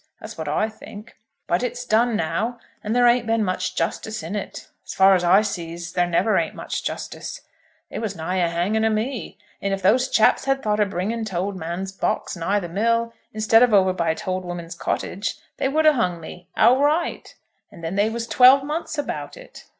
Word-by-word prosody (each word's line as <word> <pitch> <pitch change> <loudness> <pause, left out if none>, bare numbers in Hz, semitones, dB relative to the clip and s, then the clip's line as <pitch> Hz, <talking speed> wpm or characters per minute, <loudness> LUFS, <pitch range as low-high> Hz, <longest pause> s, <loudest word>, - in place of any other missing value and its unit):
That's - - -9
what 160 -1 -6
I 155 +9 +1
think. 220 0 -12 0.3
But 175 - 0
it's 245 0 -3
done 235 +1 +2
now, 220 +7 -1 0.3
and 215 +2 -2
there 245 0 +4
ain't 240 -1 +3
been 225 -1 +2
much 185 0 -2
justice 215 +4 -3
in 170 +6 -5
it. 205 - -6 0.2
As - - -8
far 195 0 +6
as 180 -2 +2
I 190 +4 +5
sees, 170 -3 -5
there 175 -1 +2
never 190 +5 +2
ain't - - -3
much - - -4
justice. - - -5 0.5
They - - -4
was 215 -3 -3
nigh 175 +3 -3
a 175 -2 +2
hanging 185 +6 0
o' 220 - +3
me; 220 +3 -3 0.2
and 200 0 0
if 195 - -11
those 250 +7 +3
chaps 220 - +3
had 270 0 0
thought 210 -2 0
o' 210 - +4
bringing 200 +4 -3
t'old 195 -1 -3
man's 180 +2 -4
box 195 - -2
nigh 185 +4 0
the 175 - -5
mill, 230 +5 0 0.2
instead 220 +1 +4
of 245 -4 +5
over 190 -1 +4
by 165 -3 0
t'old 185 -2 -3
woman's 175 -1 -6
cottage, 185 +3 -3 0.2
they - - 0
would 310 +3 +1
a 310 - +7
hung 180 -9 0
me; 175 +2 -11
outright. 290 +8 +2 0.4
And 170 - -13
then 165 +2 -3
they 205 +2 +2
was 230 +1 -4
twelve 260 +3 +6
months 310 +2 -4
about 290 - -4
it! - - -14
210 Hz, 205 wpm, -23 LUFS, 180-235 Hz, 0.5 s, a